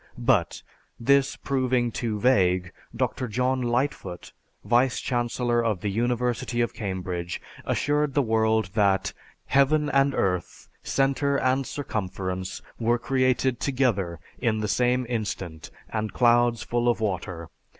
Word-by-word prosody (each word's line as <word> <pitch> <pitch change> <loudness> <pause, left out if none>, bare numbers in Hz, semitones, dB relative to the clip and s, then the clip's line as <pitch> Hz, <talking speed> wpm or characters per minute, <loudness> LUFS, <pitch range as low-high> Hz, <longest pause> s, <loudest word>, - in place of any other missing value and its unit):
But, - - +1 0.4
this 140 +3 +3
proving 130 -3 0
too 110 -2 -2
vague, 95 -6 +3 0.2
Dr. 130 +1 -1
John 125 +3 0
Lightfoot, 120 -7 -2 0.3
vice 125 +2 +3
chancellor 120 -1 0
of 105 -6 0
the 105 - -1
University 120 +2 -1
of 120 -1 +1
Cambridge, 90 -3 -4 0.3
assured 145 -1 0
the 145 - +4
world 110 -3 +1
that, 100 -2 +2 0.3
"Heaven 145 +2 +3
and 135 0 +3
earth, 90 -2 -2
centre 140 +1 +1
and 130 0 +1
circumference, 95 -8 -4 0.2
were 120 +1 +2
created 130 -1 +1
together, 115 - 0 0.2
in 115 -3 +1
the 110 0 -1
same 125 +3 +1
instant, 100 -8 -4 0.2
and 110 -1 -3
clouds 120 -1 +3
full 120 0 +1
of 120 - +1
water 90 -5 -3
120 Hz, 125 wpm, -26 LUFS, 100-130 Hz, 0.4 s, the